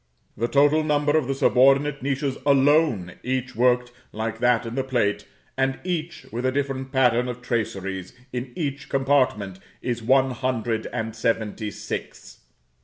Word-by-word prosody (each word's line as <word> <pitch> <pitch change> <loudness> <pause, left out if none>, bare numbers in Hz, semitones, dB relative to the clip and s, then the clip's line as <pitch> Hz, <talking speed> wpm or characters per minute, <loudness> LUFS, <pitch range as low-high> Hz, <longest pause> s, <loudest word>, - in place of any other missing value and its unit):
The 115 - -1
total 145 +4 +4
number 145 0 +1
of 155 -5 +2
the 135 - -1
subordinate 135 +2 +4
niches 135 0 -1
alone, 140 - +3
each 130 0 -2
worked 125 +1 +2 0.2
like 110 +1 -4
that 120 -1 +3
in 115 - -5
the 135 +1 -1
plate, 120 -6 0 0.3
and 135 0 0
each 170 -2 -3
with 120 +3 -3
a 130 - +2
different 135 -1 -2
pattern 125 -2 +3
of 125 0 -5
traceries 95 -6 -3 0.2
in 125 0 -4
each 145 -3 -4
compartment, 130 -9 +1 0.2
is 120 -1 -3
one 130 +3 +3
hundred 120 -3 -2
and 110 0 -3
seventy 110 -1 -1
six. - - -7
130 Hz, 150 wpm, -24 LUFS, 115-140 Hz, 0.3 s, total